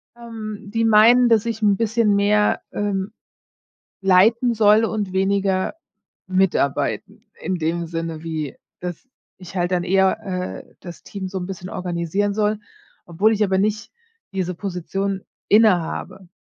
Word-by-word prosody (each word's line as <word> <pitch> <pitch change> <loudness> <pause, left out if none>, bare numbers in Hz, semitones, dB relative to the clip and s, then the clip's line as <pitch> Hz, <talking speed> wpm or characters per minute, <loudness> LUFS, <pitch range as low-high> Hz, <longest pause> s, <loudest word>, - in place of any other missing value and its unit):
Ähm, 220 -3 -8
die 230 0 +1
meinen, 230 +3 +6
dass 225 -2 +3
ich 225 -1 -3
'n 205 -2 +4
bisschen 225 -1 +2
mehr, 210 +1 +2
ähm, 200 -1 -2 0.9
leiten 215 +6 +4
soll 215 0 +5
und 210 -4 -2
weniger 195 +1 0 0.5
mitarbeiten 185 -7 0 0.2
in 185 +3 -2
dem 170 +1 -2
Sinne 165 -1 -5
wie 155 -4 -4 0.2
dass 180 +8 -7 0.3
ich 185 0 -11
halt 175 0 0
dann 175 -1 +1
eher, 190 +1 +2 0.4
äh, - - -25
das 175 -2 -10
Team 195 -2 -6
so 190 0 -4
'n 180 - -5
bisschen 185 -1 -7
organisieren 180 +3 -2
soll, 210 0 0 0.5
obwohl 190 +6 +2
ich 215 -1 0
aber 190 -1 +1
nicht 210 +2 -1 0.4
diese 185 -2 -2
Position 195 +1 -3 0.3
inne 215 -2 +6
habe. 185 +3 -7
195 Hz, 145 wpm, -21 LUFS, 180-215 Hz, 0.9 s, meinen